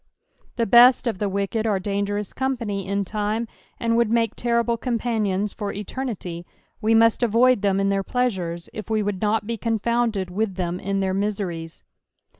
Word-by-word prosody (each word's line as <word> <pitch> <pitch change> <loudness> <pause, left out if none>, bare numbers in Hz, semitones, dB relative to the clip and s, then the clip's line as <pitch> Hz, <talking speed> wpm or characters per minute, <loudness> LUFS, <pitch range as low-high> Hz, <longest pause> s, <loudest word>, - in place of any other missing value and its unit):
The 235 - +1
best 245 +4 +7
if 225 -6 -1
the 205 - 0
wicked 200 +3 -1
are 205 -3 +2
dangerous 200 +1 -2
company 230 -7 -2
in 200 0 -1
lime, 215 +2 -1 0.3
and 230 -1 +1
would 235 -2 +3
make 230 0 +1
terrible 235 0 +1
companions 220 -4 -1
for 205 -2 -4
eternity; 205 -6 -5 0.4
we 225 +1 +3
must 230 +1 +4
avoid 240 0 +4
them 195 -1 +2
in 195 0 +1
their 195 0 +1
pleasures, 185 -8 -2
if 215 +1 -7
we 215 -1 +1
would 200 -2 -3
nut 210 0 +1
be 230 +1 -3
confounded 225 -3 0
with 200 0 -1
them 180 -1 -2
in 195 0 -1
their 190 -1 0
miseries. 190 -5 -3
210 Hz, 170 wpm, -23 LUFS, 195-230 Hz, 0.4 s, best